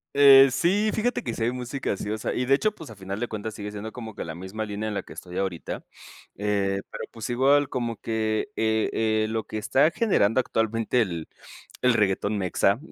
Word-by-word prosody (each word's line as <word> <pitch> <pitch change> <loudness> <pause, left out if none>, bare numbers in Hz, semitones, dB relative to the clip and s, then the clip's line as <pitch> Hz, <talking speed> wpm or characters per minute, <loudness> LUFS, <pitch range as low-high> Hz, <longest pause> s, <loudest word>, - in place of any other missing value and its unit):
Eh, 135 -1 +9
sí, 190 - +2
fíjate 245 +3 0
que 115 - -3
si 115 - -3
hay 115 - +2
música 125 +2 -3
así, 105 +1 -4
o 110 - -1
sea, - - -2
y 125 - 0
de 135 - +3
hecho, 215 +10 +3
pues, 160 - -11
a - - -10
final 95 +1 -6
de 120 - -1
cuentas 110 -1 -5
sigue 105 0 -6
siendo 105 +1 -6
como 115 -3 -8
que - - -5
la 80 -1 -6
misma 95 +5 -5
línea 105 0 -4
en 105 - -3
la 100 - -2
que - - -16
estoy 90 -1 -6
ahorita, 95 -4 -3 0.5
eh, 100 -1 0
pero - - -6
pues, 115 +1 -5
igual 140 +3 +4
como 120 -3 -2
que, 110 - -1
eh, 110 0 +1
eh, 110 -1 +1
lo 110 0 -2
que 110 - -5
está 135 +7 +3
generando 130 - +2
actualmente 115 0 +1
el 85 -7 -3 0.6
el 125 -1 +5
reguetón 105 -1 +1
mexa 100 +3 +2
110 Hz, 220 wpm, -26 LUFS, 105-125 Hz, 0.6 s, Eh